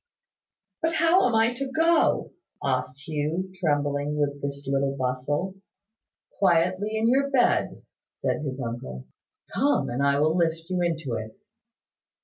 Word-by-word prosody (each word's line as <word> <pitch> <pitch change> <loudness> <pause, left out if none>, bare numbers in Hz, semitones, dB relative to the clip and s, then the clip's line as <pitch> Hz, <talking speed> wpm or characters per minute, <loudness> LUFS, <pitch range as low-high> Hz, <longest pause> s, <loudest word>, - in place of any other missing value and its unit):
"But 325 0 +1
how 335 +4 +4
am 235 - 0
I 225 +2 +3
to 265 +2 -4
go?" 325 +3 +2 0.3
asked 130 +1 -2
Hugh, 160 +5 -2
trembling 145 -4 0
with 145 -1 -1
this 140 0 -5
little 135 0 0
bustle. 130 +8 -1 0.9
"Quietly 185 +4 +2
in 220 +1 +2
your 275 +3 +3
bed," 270 -3 +2 0.3
said - - -2
his 135 -3 -4
uncle. 115 - -5 0.5
"Come, 285 - +1
I 140 +3 +2
will 155 +2 +2
lift 165 0 0
you 180 -1 0
into 160 -7 -1
it." 110 -1 -5
155 Hz, 130 wpm, -26 LUFS, 140-215 Hz, 0.9 s, how